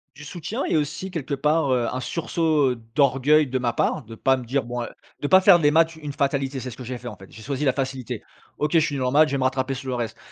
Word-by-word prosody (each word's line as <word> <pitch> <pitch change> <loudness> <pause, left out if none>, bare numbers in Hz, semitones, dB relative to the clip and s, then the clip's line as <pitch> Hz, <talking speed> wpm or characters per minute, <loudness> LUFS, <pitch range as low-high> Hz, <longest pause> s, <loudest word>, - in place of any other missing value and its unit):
Du 150 +1 -11
soutien 180 - -4
et - - 0
aussi 155 +5 -2
quelque 160 -6 -4
part, 150 +1 +1
heu, 120 -2 +1
un 130 - -4
sursaut, 155 -3 +1
heu, - - -2 0.2
d'orgueil 140 +2 +4
de 130 0 -1
ma 120 -1 0
part, 130 +5 0
de 115 0 -11
pas 135 +4 +2
me 130 - -6
dire, 130 +3 -1
bon 120 +1 -4 0.4
de 145 - -1
pas 185 - +7
faire 190 -1 +7
des 145 -2 +3
maths 165 +1 +3
une 150 -2 -6
fatalité, 140 -1 -1
c'est 130 - -6
ce 120 - -9
que 130 - -9
j'ai 125 +1 -5
fait, 120 +1 -10
en 115 - -6
fait, 95 0 -15
j'ai 110 - -12
choisi 140 +4 -3
la 135 - +4
facilité. 130 -2 -4 0.4
OK, 150 0 -1
je 165 - +6
suis 150 -2 -1
normal, 140 +4 +3
je - - -6
vais 140 - 0
me 135 - -1
rattraper 130 +1 0
sur 135 0 -7
le 130 - -1
reste. 120 -3 -4
135 Hz, 280 wpm, -24 LUFS, 125-150 Hz, 0.4 s, pas